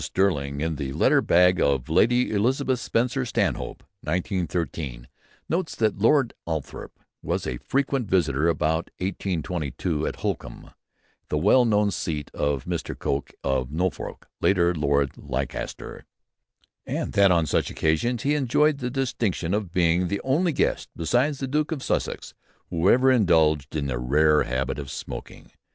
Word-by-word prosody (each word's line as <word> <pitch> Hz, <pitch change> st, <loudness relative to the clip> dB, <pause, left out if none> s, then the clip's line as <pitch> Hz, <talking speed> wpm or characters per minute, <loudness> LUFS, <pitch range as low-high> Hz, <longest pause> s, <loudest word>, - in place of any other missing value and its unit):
Stirling, 70 Hz, -7 st, 0 dB
in 80 Hz, -1 st, -1 dB
"The 70 Hz, -2 st, -4 dB
Letter -, -, +4 dB
Bag 90 Hz, +1 st, +4 dB
of 70 Hz, -3 st, +1 dB
Lady 120 Hz, +10 st, +3 dB
Elizabeth 130 Hz, +5 st, +1 dB
Spencer 125 Hz, +4 st, 0 dB
Stanhope," 65 Hz, -, -2 dB, 0.2 s
1913, 85 Hz, -, -3 dB, 0.4 s
notes 165 Hz, 0 st, -2 dB
that 110 Hz, -3 st, 0 dB
Lord 120 Hz, +3 st, +3 dB
Althorp 80 Hz, -3 st, -5 dB, 0.2 s
was -, -, -2 dB
a 65 Hz, -2 st, -3 dB
frequent 135 Hz, -, -1 dB
visitor 80 Hz, -5 st, +2 dB
about 80 Hz, 0 st, 0 dB
1822 85 Hz, -4 st, -2 dB
at -, -, -3 dB
Holkham, -, -, -4 dB, 0.6 s
the 75 Hz, -, 0 dB
well 105 Hz, +10 st, +4 dB
known 105 Hz, -2 st, +2 dB
seat 75 Hz, -5 st, -4 dB
of 70 Hz, -3 st, -1 dB
Mr. -, -, -4 dB
Coke 70 Hz, +1 st, -2 dB
of 65 Hz, -1 st, -1 dB
Norfolk, 90 Hz, +4 st, -3 dB
later 90 Hz, -2 st, +3 dB
Lord 70 Hz, -3 st, 0 dB
Leicester, 65 Hz, -2 st, -5 dB, 0.8 s
and -, -, -3 dB
that 100 Hz, -1 st, +5 dB
on 85 Hz, -3 st, +3 dB
such -, -, 0 dB
occasions 105 Hz, +10 st, 0 dB
he 145 Hz, -, +2 dB
enjoyed 150 Hz, +1 st, +2 dB
"the 125 Hz, -2 st, -2 dB
distinction 120 Hz, -9 st, -1 dB
of 105 Hz, -4 st, -2 dB
being 90 Hz, 0 st, +2 dB
the 100 Hz, +2 st, -2 dB
only 160 Hz, +7 st, +2 dB
guest -, -, 0 dB
besides 120 Hz, -, +1 dB
the 135 Hz, -, -3 dB
Duke 150 Hz, +4 st, 0 dB
of 145 Hz, -5 st, -3 dB
Sussex -, -, -2 dB, 0.4 s
who 85 Hz, +3 st, +2 dB
ever 130 Hz, +2 st, +5 dB
indulged 80 Hz, -, +3 dB
in 75 Hz, -2 st, -1 dB
the 65 Hz, -3 st, -2 dB
rare 75 Hz, +5 st, +3 dB
habit 65 Hz, +3 st, -2 dB
of 70 Hz, -2 st, -6 dB
smoking. -, -, -8 dB
90 Hz, 145 wpm, -25 LUFS, 75-120 Hz, 0.8 s, that